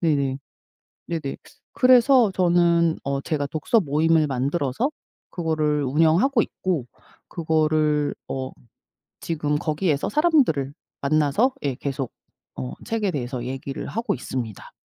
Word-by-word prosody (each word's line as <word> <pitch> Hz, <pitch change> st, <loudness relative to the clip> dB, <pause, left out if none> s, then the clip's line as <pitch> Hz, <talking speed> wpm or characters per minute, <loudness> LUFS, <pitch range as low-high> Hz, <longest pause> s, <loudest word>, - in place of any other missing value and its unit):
네네. 140 Hz, -5 st, +1 dB, 0.7 s
네네. 155 Hz, -5 st, -3 dB, 0.4 s
그래서 250 Hz, -3 st, +5 dB
저는 170 Hz, -2 st, +3 dB
어 140 Hz, 0 st, -2 dB
제가 145 Hz, -2 st, -2 dB
독서 160 Hz, +10 st, +1 dB
모임을 160 Hz, 0 st, +2 dB
만들어서 140 Hz, -, -1 dB, 0.4 s
그거를 155 Hz, -3 st, 0 dB
운영하고 165 Hz, -, +3 dB
있고 175 Hz, -12 st, -2 dB, 0.4 s
그거를 155 Hz, -2 st, +1 dB
어 130 Hz, -1 st, -4 dB, 0.7 s
지금 150 Hz, -3 st, -1 dB
거기에서 155 Hz, -1 st, 0 dB
사람들을 275 Hz, -, +2 dB, 0.3 s
만나서 155 Hz, -, +2 dB
예 140 Hz, -3 st, -1 dB
계속 135 Hz, -1 st, -4 dB, 0.4 s
어 65 Hz, -1 st, -5 dB
책에 215 Hz, -4 st, -1 dB
대해서 125 Hz, -4 st, -4 dB
얘기를 135 Hz, +1 st, -5 dB
하고 230 Hz, +3 st, -2 dB
있습니다. 120 Hz, -5 st, -6 dB
155 Hz, 265 characters per minute, -23 LUFS, 140-175 Hz, 0.7 s, 그래서